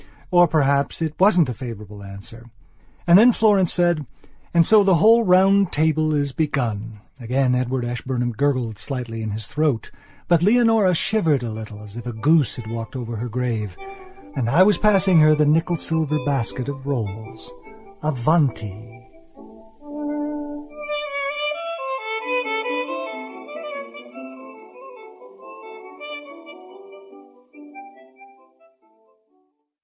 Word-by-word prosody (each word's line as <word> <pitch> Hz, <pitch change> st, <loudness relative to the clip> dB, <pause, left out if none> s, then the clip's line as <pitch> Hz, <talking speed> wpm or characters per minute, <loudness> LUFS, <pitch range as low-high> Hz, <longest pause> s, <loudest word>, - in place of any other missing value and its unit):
Or, 175 Hz, -1 st, +6 dB
perhaps, 140 Hz, -3 st, +1 dB
it 160 Hz, -2 st, -1 dB
wasn't 180 Hz, -5 st, +5 dB
a -, -, -2 dB
favourable 105 Hz, -4 st, -9 dB
answer. 100 Hz, +4 st, -12 dB, 0.6 s
And 175 Hz, +2 st, +7 dB
then 240 Hz, +3 st, +7 dB
Florence 205 Hz, -6 st, +3 dB
said: 175 Hz, -3 st, +1 dB, 0.5 s
"And 170 Hz, -1 st, +4 dB
so 215 Hz, +2 st, +6 dB
the 190 Hz, -2 st, +4 dB
whole 225 Hz, +7 st, +5 dB
round 195 Hz, 0 st, +4 dB
table 155 Hz, 0 st, +1 dB
is 145 Hz, -1 st, 0 dB
begun." 115 Hz, -8 st, -2 dB, 0.2 s
Again 125 Hz, +2 st, 0 dB
Edward 125 Hz, 0 st, -1 dB
Ashburnham 120 Hz, 0 st, -3 dB
gurgled 120 Hz, -3 st, -1 dB
slightly 120 Hz, -2 st, -5 dB
in 110 Hz, -, -3 dB
his 105 Hz, 0 st, -5 dB
throat; 150 Hz, -4 st, -1 dB, 0.4 s
but 170 Hz, -2 st, +3 dB
Leonora 220 Hz, -2 st, +4 dB
shivered 165 Hz, -, +1 dB
a 115 Hz, -, -4 dB
little, 110 Hz, -1 st, -8 dB
as 105 Hz, 0 st, -12 dB
if 120 Hz, +1 st, -7 dB
a 120 Hz, -, -4 dB
goose 145 Hz, +5 st, +2 dB
had 120 Hz, -, -8 dB
walked 115 Hz, +2 st, -6 dB
over 120 Hz, -3 st, -5 dB
her 120 Hz, +3 st, -4 dB
grave. 115 Hz, -2 st, -3 dB, 0.6 s
And 125 Hz, -4 st, -1 dB
I 165 Hz, +9 st, +6 dB
was 205 Hz, -2 st, +3 dB
passing 195 Hz, -4 st, +4 dB
her 155 Hz, 0 st, +6 dB
the 150 Hz, 0 st, +2 dB
nickel 165 Hz, +4 st, +2 dB
silver 160 Hz, -1 st, -1 dB
basket 130 Hz, -2 st, -2 dB
of 140 Hz, -2 st, -6 dB
rolls. 110 Hz, -2 st, -5 dB, 0.5 s
Avanti!... 125 Hz, -, -1 dB
140 Hz, 105 wpm, -22 LUFS, 115-170 Hz, 0.6 s, And